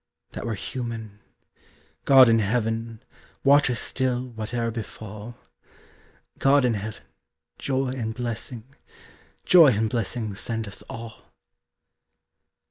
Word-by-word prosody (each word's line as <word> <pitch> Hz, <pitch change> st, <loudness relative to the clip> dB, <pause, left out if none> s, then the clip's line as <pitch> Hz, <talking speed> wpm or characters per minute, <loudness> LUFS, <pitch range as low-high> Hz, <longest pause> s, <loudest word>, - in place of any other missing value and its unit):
That -, -, -6 dB
were 110 Hz, -, -1 dB
human! 115 Hz, -1 st, -6 dB, 0.9 s
God 135 Hz, -2 st, +8 dB
in 115 Hz, 0 st, +4 dB
heaven, 115 Hz, +1 st, -2 dB, 0.4 s
Watch 140 Hz, 0 st, +5 dB
us 120 Hz, -, 0 dB
still 130 Hz, -1 st, -1 dB
whate'er 115 Hz, +1 st, -3 dB
befall! 110 Hz, 0 st, -8 dB, 1.0 s
God 140 Hz, -1 st, +4 dB
in 120 Hz, -, +2 dB
heaven, 105 Hz, 0 st, -6 dB, 0.6 s
joy 135 Hz, -1 st, -1 dB
and 120 Hz, -4 st, -3 dB
blessing, 120 Hz, 0 st, -5 dB, 0.8 s
Joy 170 Hz, -4 st, +8 dB
and 110 Hz, +1 st, 0 dB
blessing 115 Hz, -2 st, -2 dB
send 115 Hz, +2 st, -4 dB
us 100 Hz, -, -7 dB
all! 115 Hz, -1 st, -10 dB
115 Hz, 110 wpm, -25 LUFS, 110-125 Hz, 1.0 s, God